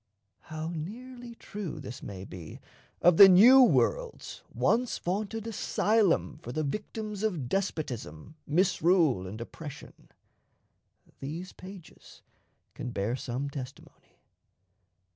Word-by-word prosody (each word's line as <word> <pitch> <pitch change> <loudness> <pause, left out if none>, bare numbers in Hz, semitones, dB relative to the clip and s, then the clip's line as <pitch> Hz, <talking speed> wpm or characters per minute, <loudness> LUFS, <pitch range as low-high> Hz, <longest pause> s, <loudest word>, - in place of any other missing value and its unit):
How 155 +1 -6
nearly 240 +8 -8
true 205 -6 -7
this 120 - -8
may 95 -2 -8
be 90 -4 -10 0.4
of 175 -1 +6
the 195 -1 +11
New 235 +9 +8
World's - - +1
once 245 +1 +1
vaunted 210 +4 -3
asylum 215 -6 +1
for 120 - -7
the 155 +5 -2
victims 210 +5 -5
of 180 - -1
despotism, 145 - -4
misrule, 165 - +2
and 105 +4 -7
oppression, 145 +5 -10 1.1
these 165 +7 -6
pages 185 -2 -13 0.5
can 125 - -6
bear 110 +1 -2
some 130 +2 -4
testimony. 140 -2 -10
175 Hz, 105 wpm, -29 LUFS, 135-210 Hz, 1.1 s, the